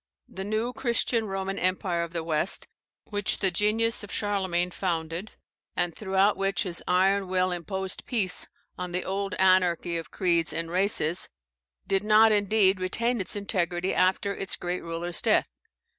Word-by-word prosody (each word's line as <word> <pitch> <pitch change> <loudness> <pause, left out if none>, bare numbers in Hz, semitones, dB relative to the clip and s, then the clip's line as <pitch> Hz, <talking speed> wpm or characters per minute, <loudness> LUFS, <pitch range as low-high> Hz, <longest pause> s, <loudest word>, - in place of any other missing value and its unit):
The 190 - -7
new 215 +4 -2
Christian 235 -2 0
Roman 195 0 -3
Empire 185 -1 0
of 170 -1 -4
the 170 -1 -3
West, 160 +2 -1 0.4
which 205 0 0
the 190 -2 +1
genius 215 +5 +1
of 205 - -9
Charlemagne 190 -4 -1
founded, 170 +1 -3 0.4
and 175 -2 -1
throughout 195 0 +2
which 195 0 0
his 175 -3 -3
iron 190 +2 +2
will 185 0 +1
imposed 190 +2 -4
peace 200 -8 0 0.3
on 180 -1 -5
the 180 - -2
old 195 +1 -2
anarchy 180 -2 +2
of 165 - -6
creeds 170 -4 +1
and 165 0 -4
races, 180 -3 +2 0.6
did 195 +1 +1
not 215 +1 +6
indeed 200 -2 +3
retain 230 +5 0
its 190 - -2
integrity 185 -3 -1
after 190 +2 +1
its 195 -1 0
great 180 +1 -4
ruler's 170 +1 +1
death. - - +2
190 Hz, 155 wpm, -27 LUFS, 175-205 Hz, 0.6 s, not